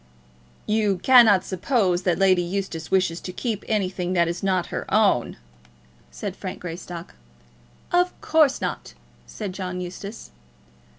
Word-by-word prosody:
"You 210 -2 +1
cannot 220 -2 +6
suppose 185 -2 0
that 180 -3 +1
Lady 190 -2 +4
Eustace 175 -3 -4
wishes 185 -3 +1
to 185 - -6
keep 220 +1 -3
anything 185 -4 -1
that 170 -2 +3
is 170 +1 -3
not 185 -2 +1
her - - -4
own," 195 - +2 0.7
said - - -6
Frank - - -6
Greystock. 175 0 -7 0.8
"Of 355 +1 +1
course 310 -4 +3
not," - - -4 0.3
said 205 -4 -6
John 180 -1 -5
Eustace. 185 - -8
185 Hz, 130 wpm, -24 LUFS, 175-210 Hz, 0.8 s, cannot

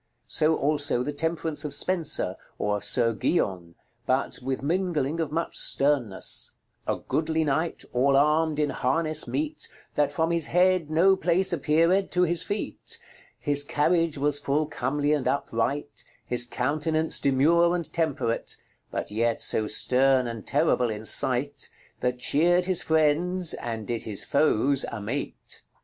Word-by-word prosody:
So 155 +1 +3
also 145 -4 0
the 145 - -3
Temperance 160 0 -2
of 145 -2 -1
Spenser, 175 -3 0 0.2
or 105 0 -1
Sir 115 -2 +3
Guyon, 90 - -1 0.3
but 130 +1 0
with 130 +1 -3
mingling 165 -2 -1
of 160 -3 -2
much 165 +2 -3
sternness: 135 -9 +1 0.3
"A - - +1
goodly 160 0 -1
knight, 155 +3 -1
all 135 +3 +2
armd 150 +2 +2
in 150 -1 0
harnesse 155 +4 -1
meete, 310 +1 -3 0.3
That 145 -1 +1
from 160 +3 0
his 170 -3 +3
head 180 -2 +2
no 175 +5 +4
place 185 0 +1
appeared 165 +5 +2
to 180 0 +3
his 170 -1 0
feete, 205 - -4 0.4
His 145 -1 +2
carriage 165 +2 +1
was 145 +1 0
full 145 +2 0
comely 145 0 -1
and 145 -4 -1
upright; 140 +1 -2 0.2
His 120 0 +3
countenance 155 +6 -1
demure 165 +6 +3
and 170 -2 -2
temperate; 135 -8 -1 0.3
But - - -5
yett 115 +2 0
so 110 - 0
sterne 130 +3 +2
and 115 -2 -6
terrible 140 -5 +2
in 110 0 -5
sight, 130 +5 +1 0.3
That 125 0 -1
cheard 175 +8 +2
his 185 -2 +4
friendes, 160 +3 +2
and 115 -2 -5
did 115 0 -2
his 105 -3 -2
foes 140 -1 +2
amate." 115 +5 -5
145 Hz, 145 wpm, -26 LUFS, 130-165 Hz, 0.4 s, no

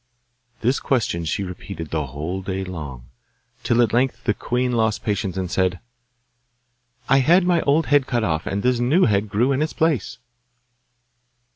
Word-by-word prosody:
This 125 +4 +1
question 110 -10 -1
she 90 +5 -1
repeated 90 -3 -7
the 75 -3 -1
whole 80 +8 -4
day 95 0 -3
long, 75 -9 -8 0.5
till 120 0 +3
at 110 - -1
length 125 +2 +1
the 105 - +1
queen 125 +3 -1
lost 110 -3 0
patience 100 -3 -2
and 95 -2 -3
said: 95 -1 0 1.3
'I 135 +1 +5
had 170 +8 +4
my 175 -2 +3
old 145 +3 +2
head 145 -2 +3
cut 120 -3 0
off, 80 -6 -1
and 100 +1 -2
this 125 -1 +2
new 140 +10 +3
head 105 -1 +1
grew 120 +7 +1
in 135 +1 0
its 155 - -1
place. 135 - 0
110 Hz, 165 wpm, -22 LUFS, 95-130 Hz, 1.3 s, I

